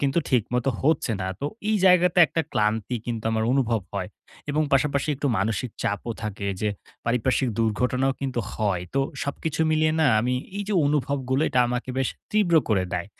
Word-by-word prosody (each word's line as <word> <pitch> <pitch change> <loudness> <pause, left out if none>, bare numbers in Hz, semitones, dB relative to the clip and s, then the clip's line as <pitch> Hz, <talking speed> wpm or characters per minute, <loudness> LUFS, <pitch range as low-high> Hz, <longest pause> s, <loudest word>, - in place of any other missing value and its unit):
কিন্তু 140 +4 +1
ঠিক 125 -4 +4
মতো 125 +2 +1
হচ্ছে 145 -5 +1
না। 95 - -2
তো 140 - -1 0.2
এই 215 - +3
জায়গাতে 180 -1 +5
একটা 165 +2 -1
ক্লান্তি 110 +3 0
কিন্তু 115 -2 -3
আমার 110 0 0
অনুভব 120 -5 +1
হয়। 95 -2 -2 0.4
এবং 150 +2 +1
পাশাপাশি 140 +1 +2
একটু 145 - -2
মানসিক 110 +4 -1
চাপও 105 +3 -2
থাকে, 105 -1 -4
যে 105 - +1 0.4
পারিপার্শ্বিক 125 +2 +1
দুর্ঘটনাও 125 +4 +1
কিন্তু 130 -3 -2
হয়। 100 -5 0
তো 135 - +3 0.2
সবকিছু 150 +2 -3
মিলিয়ে 155 0 +2
না, 155 - +4
আমি 125 +3 0 0.2
এই 205 - -2
যে 210 - 0
অনুভবগুলো 140 -1 0
এটা 125 - +2
আমাকে 125 +1 -3
বেশ 135 - +1 0.2
তীব্র 205 -5 +3
করে 95 -4 +2
দেয়। 90 +2 -2
125 Hz, 175 wpm, -25 LUFS, 110-145 Hz, 0.4 s, জায়গাতে